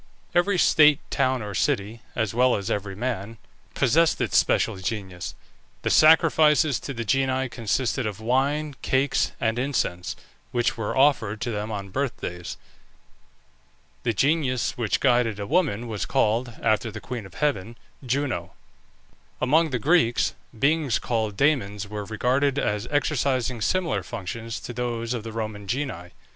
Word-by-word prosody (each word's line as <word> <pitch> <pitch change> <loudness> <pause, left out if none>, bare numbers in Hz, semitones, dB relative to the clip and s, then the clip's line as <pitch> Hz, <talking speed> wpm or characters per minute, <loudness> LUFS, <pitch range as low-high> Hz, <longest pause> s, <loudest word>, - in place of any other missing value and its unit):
Every 180 +2 +3
state, 150 -4 +6
town, 130 -3 +1
or 105 -1 -6
city, 110 0 -1
(as 110 -3 -1
well 125 +1 +4
as 100 +3 -3
every 100 -1 -3
man), 115 -1 -4 0.4
possessed 160 +6 +3
its - - -1
special - - +3
genius. 95 -2 -5 0.5
The - - 0
sacrifices 155 -3 +5
to 140 - -6
the 115 0 -4
genii 130 +2 +1
consisted 120 +1 -1
of 105 -1 -5
wine, 140 +5 0
cakes, 135 +1 +1
and 115 +1 0
incense, 120 -10 -1 0.4
which 120 -1 +1
were 110 +2 -3
offered 120 -7 +3
to 120 -1 -2
them 105 0 -3
on 100 -2 -5
birthdays. 95 -7 -4 1.4
The 120 - 0
genius 130 +1 +1
which 110 -6 0
guided 120 -5 +2
a 100 - -3
woman 120 - +1
was 110 -3 -3
called, 115 +3 +1
after 110 +1 +2
the - - -7
queen 120 -6 -6
of 90 - -18
heaven, 120 -6 -1 0.3
Juno. 130 +1 -2 0.9
Among 160 +4 +3
the 130 - -1
Greeks, 135 -2 +2 0.2
beings 145 -1 +2
called 110 -4 -2
Dæmons 105 -9 +1
were 105 0 -6
regarded 130 +6 +1
as 105 -4 -1
exercising 130 -5 0
similar 170 - 0
functions 115 +6 -6
to 120 - -7
those 120 -1 -2
of 120 - -3
the 115 +1 -7
Roman 110 -2 -5
genii. 100 -8 -3
120 Hz, 145 wpm, -25 LUFS, 105-140 Hz, 1.4 s, state